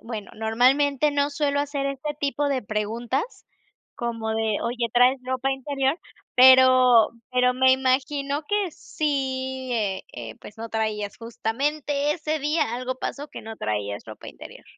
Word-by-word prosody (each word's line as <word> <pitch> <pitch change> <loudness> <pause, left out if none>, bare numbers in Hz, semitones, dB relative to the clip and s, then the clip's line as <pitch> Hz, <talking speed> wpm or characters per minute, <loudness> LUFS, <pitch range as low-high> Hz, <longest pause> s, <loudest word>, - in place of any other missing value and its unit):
bueno, 225 -3 -7
normalmente 260 +6 +2
no 285 0 +1
suelo 285 -1 0
hacer 285 -1 -2
este 275 +2 -4
tipo 285 0 0
de 270 -3 -1
preguntas, 225 - -3 0.5
como 230 -2 -3
de 220 -2 0
oye: 235 0 -1
"¿Traes 250 +2 +5
ropa 260 +1 -1
interior?" 270 +2 -1 0.4
Pero 255 -2 +7 0.2
pero 250 0 +3
me 260 0 +5
imagino 275 +3 0
que 410 -2 0
sí, 265 -4 -3
e 205 -5 -1
eh, 115 -2 -7
pues 210 - -13
no 230 +1 -6
traías, 215 -2 -2
justamente, 280 +6 -1
ese 310 -1 -2
día 295 -4 0
algo 255 +1 -3
pasó, 290 +3 -5
que - - -9
no 220 0 -9
traías 105 -1 -3
ropa 110 -1 -10
interior. - - -12
260 Hz, 145 wpm, -24 LUFS, 225-285 Hz, 0.5 s, Pero